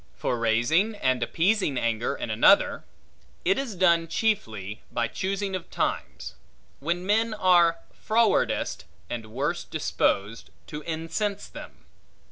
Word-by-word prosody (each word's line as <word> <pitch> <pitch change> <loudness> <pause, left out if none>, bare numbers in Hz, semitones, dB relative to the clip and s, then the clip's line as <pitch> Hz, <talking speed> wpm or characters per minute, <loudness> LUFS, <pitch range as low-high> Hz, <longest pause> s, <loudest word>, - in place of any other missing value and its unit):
For 120 - -2
raising 120 - +2
and 130 -9 0
appeasing 175 - +1
anger 115 -1 -1
in 110 - -5
another; 110 - +4 0.6
it 190 +7 +3
is 255 -7 -4
done 170 -2 +3
chiefly 110 - -2
by 120 -1 0
choosing 195 - -3
of 185 - -6
times, - - -3 0.5
when 170 +5 -2
men 220 +2 +1
are 175 -4 +4 0.2
frowardest 220 - +1 0.3
and 115 -2 -4
worst 145 +8 -2
disposed, 105 - -1 0.2
to 150 - -7
incense 170 +6 -3
them. - - -12
165 Hz, 120 wpm, -26 LUFS, 120-195 Hz, 0.6 s, another